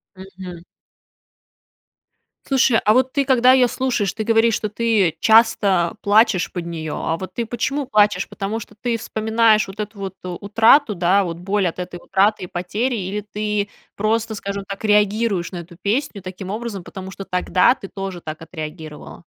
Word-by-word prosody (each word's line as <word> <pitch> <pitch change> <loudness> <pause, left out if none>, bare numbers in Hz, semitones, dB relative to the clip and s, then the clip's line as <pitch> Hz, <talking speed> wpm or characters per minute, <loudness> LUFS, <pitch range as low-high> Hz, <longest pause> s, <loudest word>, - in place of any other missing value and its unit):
Мгм. 185 -2 -10 1.9
Слушай, 260 -3 +3
а 215 - +5
вот 255 +2 +2
ты, 280 -1 +1
когда 255 -1 +5
её 255 -1 +5
слушаешь, 240 -6 -1
ты 220 - -3
говоришь, 225 0 +3
что 215 - -3
ты 210 -6 +1
часто 210 -5 +4
плачешь 205 -2 +3
под 175 -2 -5
неё. 160 -3 -5
А 165 - -2
вот 185 +1 -8
ты 235 - -2
почему 260 +5 -2
плачешь, 210 -5 +2
потому 205 +3 -4
что 215 - -12
ты 240 -2 0
вспоминаешь 220 0 +2
вот 195 +2 -11
эту 210 0 -5
вот 195 -1 -5
утрату, 210 - +3
да, 185 +3 +3
вот 170 -2 -4
боль 195 +2 0
от 170 - -5
этой 180 0 -5
утраты 195 +4 +1
и - - -10
потери 210 +9 -2
или 200 0 -3
ты 210 0 -3 0.3
просто, 220 +2 0
скажем 200 -1 -5
так, 195 +1 -7
реагируешь 210 -2 +2
на 180 - -6
эту 170 0 -10
песню 210 0 -1
таким 185 0 -8
образом, 215 -2 -5
потому 190 +1 -9
что 195 - -8
тогда 180 +6 +2
ты 195 - -9
тоже 195 -2 -6
так 155 0 -7
отреагировала? 155 -1 -9
205 Hz, 170 wpm, -20 LUFS, 185-225 Hz, 1.9 s, а